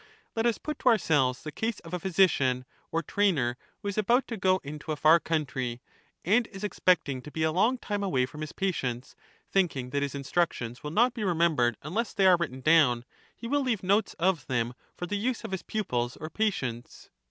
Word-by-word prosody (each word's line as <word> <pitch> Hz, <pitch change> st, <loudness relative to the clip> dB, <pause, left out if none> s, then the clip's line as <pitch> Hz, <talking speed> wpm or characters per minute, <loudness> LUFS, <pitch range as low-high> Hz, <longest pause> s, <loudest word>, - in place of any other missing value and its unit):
Let 225 Hz, +1 st, +2 dB
us 235 Hz, -, +1 dB
put 305 Hz, -2 st, -5 dB
to 255 Hz, -, +4 dB
ourselves 145 Hz, -, +2 dB
the 155 Hz, -, -5 dB
case 220 Hz, +5 st, -2 dB
of 165 Hz, +1 st, -11 dB
a 180 Hz, -, -1 dB
physician, 155 Hz, -9 st, +2 dB, 0.3 s
or 165 Hz, +1 st, 0 dB
trainer, 150 Hz, -10 st, +1 dB, 0.3 s
who -, -, -4 dB
is 200 Hz, +1 st, -1 dB
about 240 Hz, +5 st, +2 dB
to 230 Hz, -, -3 dB
go 185 Hz, -2 st, +2 dB
into 150 Hz, +2 st, -6 dB
a -, -, 0 dB
far 155 Hz, +3 st, +6 dB
country, 130 Hz, -7 st, -2 dB, 0.5 s
and 220 Hz, +6 st, +3 dB
is 195 Hz, 0 st, -10 dB
expect 185 Hz, -4 st, +2 dB
ing 130 Hz, -2 st, -3 dB
to 150 Hz, -, -10 dB
be 160 Hz, +1 st, -2 dB
a 160 Hz, -, +2 dB
long 220 Hz, +10 st, +2 dB
time 205 Hz, -4 st, -3 dB
away 135 Hz, -10 st, +1 dB
from 150 Hz, +4 st, -10 dB
his 155 Hz, -, -5 dB
patients 130 Hz, -11 st, -3 dB, 0.2 s
— -, -, -35 dB
thinking 145 Hz, -10 st, +1 dB
that 140 Hz, +1 st, 0 dB
his 140 Hz, -1 st, -2 dB
instructions 140 Hz, -4 st, -1 dB
will 150 Hz, -, -5 dB
not 235 Hz, +10 st, +3 dB
be 230 Hz, -3 st, -4 dB
remembered 160 Hz, -, +2 dB
unless 205 Hz, +10 st, -2 dB
they 195 Hz, -, +3 dB
are 185 Hz, -2 st, +7 dB
written 135 Hz, -6 st, -3 dB
down, 135 Hz, -6 st, +4 dB, 0.3 s
he -, -, -10 dB
will 285 Hz, +4 st, +1 dB
leave 235 Hz, -8 st, -1 dB
notes 200 Hz, +3 st, +2 dB
of 170 Hz, -7 st, 0 dB
them 120 Hz, -2 st, -1 dB, 0.2 s
for 175 Hz, -, -3 dB
the 205 Hz, +3 st, -2 dB
use 240 Hz, +4 st, -1 dB
of -, -, -6 dB
his 190 Hz, -, -2 dB
pupils 125 Hz, -, -2 dB
or 155 Hz, +1 st, -7 dB
patients. 130 Hz, -, -3 dB
165 Hz, 215 wpm, -28 LUFS, 135-205 Hz, 0.5 s, are